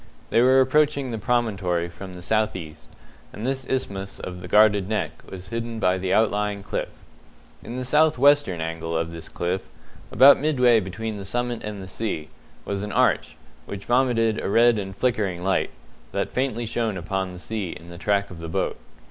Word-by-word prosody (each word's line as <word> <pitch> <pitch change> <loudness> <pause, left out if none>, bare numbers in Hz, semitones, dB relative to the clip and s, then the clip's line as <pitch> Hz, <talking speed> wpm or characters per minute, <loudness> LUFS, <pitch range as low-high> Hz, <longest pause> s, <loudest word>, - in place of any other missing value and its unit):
They 115 - +4
were 130 +2 +6
approaching 140 0 +2
the 115 - -3
promontory 100 -8 0
from 90 +2 -10
the 90 - -10
south 110 +1 +1
east, 75 -8 -9 0.4
and 110 - -6
this 130 -1 -2
isthmus 100 -7 -3
of 90 0 -7
the 90 - -7
guarded 105 -1 +4
Neck 110 - -2
was 95 0 -9
hidden 115 0 -4
by 95 -3 +2
the 95 0 -2
outlying 105 -2 +1
cliff. - - -3 0.7
In 120 - -7
the 130 - -3
south 155 +4 +4
western 145 - +4
angle 80 0 -3
of 85 0 -2
this 85 -1 -8
cliff, 90 +2 -3 0.4
about 135 +5 +8
midway 125 -6 +4
between 110 +3 -5
the 100 - -6
summit 120 +3 -2
and 105 -2 -5
the - - -9
sea, 90 -6 -4 0.4
was 100 -1 -2
an 105 0 -4
arch, 125 +5 +1 0.3
which 100 -1 -7
vomited 120 -3 +2
a - - -1
red 115 +1 +5
and 95 -1 -6
flickering 100 -6 0
light, 95 +1 +1 0.4
that - - -2
faintly 125 -2 -1
shone 115 -2 -1
upon 95 +2 -2
the 90 - -9
sea 100 0 -4
in 85 +1 -9
the 85 0 -10
track 100 0 0
of 90 - -9
the 80 0 -6
boat. - - -2
105 Hz, 190 wpm, -24 LUFS, 90-120 Hz, 0.7 s, about